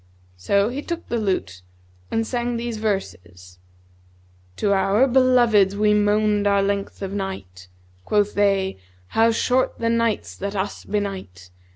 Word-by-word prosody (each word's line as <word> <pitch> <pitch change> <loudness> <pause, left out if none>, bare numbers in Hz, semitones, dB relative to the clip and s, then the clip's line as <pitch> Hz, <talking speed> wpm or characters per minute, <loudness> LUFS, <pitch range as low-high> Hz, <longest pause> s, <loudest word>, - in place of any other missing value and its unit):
So 200 - +1
he 265 +4 -4
took 340 +2 -5
the 235 - -1
lute 185 - -2 0.5
and 225 0 0
sang 240 0 -2
these 235 -1 -4
verses, 90 - -5 1.0
'To 200 - +1
our 195 +5 +3
beloveds 240 -6 +4
we 210 0 +3
moaned 210 0 +2
our 200 -1 +3
length 200 0 -3
of 195 0 -4
night; 100 - -6 0.2
* 90 0 -33
Quoth 210 -1 +1
they, 195 - +1 0.3
'How 225 +1 +3
short 250 +3 +1
the 230 - -1
nights 230 -2 -1
that 200 +1 -4
us 195 +1 -4
benight!' 190 - -5
205 Hz, 145 wpm, -22 LUFS, 190-230 Hz, 1.0 s, beloveds